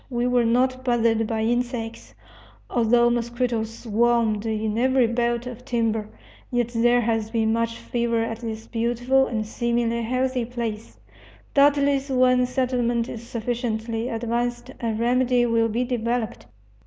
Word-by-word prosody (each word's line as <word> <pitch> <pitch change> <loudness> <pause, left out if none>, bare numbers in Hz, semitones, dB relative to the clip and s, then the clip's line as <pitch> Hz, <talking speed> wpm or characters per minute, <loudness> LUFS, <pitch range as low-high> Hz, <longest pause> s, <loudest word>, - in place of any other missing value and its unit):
We 240 -1 -1
were 250 -1 +2
not 255 +2 +1
bothered 230 -3 +2
by 220 -1 -1
insects, 240 -1 -2 0.6
although 240 0 +3
mosquitoes 235 -1 -1
swarmed 225 -1 +1
in 215 -1 -1
every 260 0 +3
belt 235 +1 0
of 250 -1 -8
timber. 225 -3 -1 0.4
Yet 240 -2 0
there 240 +1 +3
has 225 -1 -1
been 220 -1 +1
much 230 0 -1
fever 235 -1 -1
at 225 0 -4
this 225 -2 -6
beautiful 245 +3 +1
and 220 -3 -2
seemingly 235 +1 -1
healthy 255 +1 -1
place. 230 -3 -5 0.6
Doubtless 280 -1 +3
when 255 -1 +3
settlement 245 -2 0
is 235 0 -8
sufficiently 230 0 -3
advanced 240 +2 -2
a 230 -1 -1
remedy 245 +2 +2
will 230 -1 +2
be 235 +3 0
developed. 240 -2 -2
235 Hz, 135 wpm, -24 LUFS, 225-245 Hz, 0.6 s, although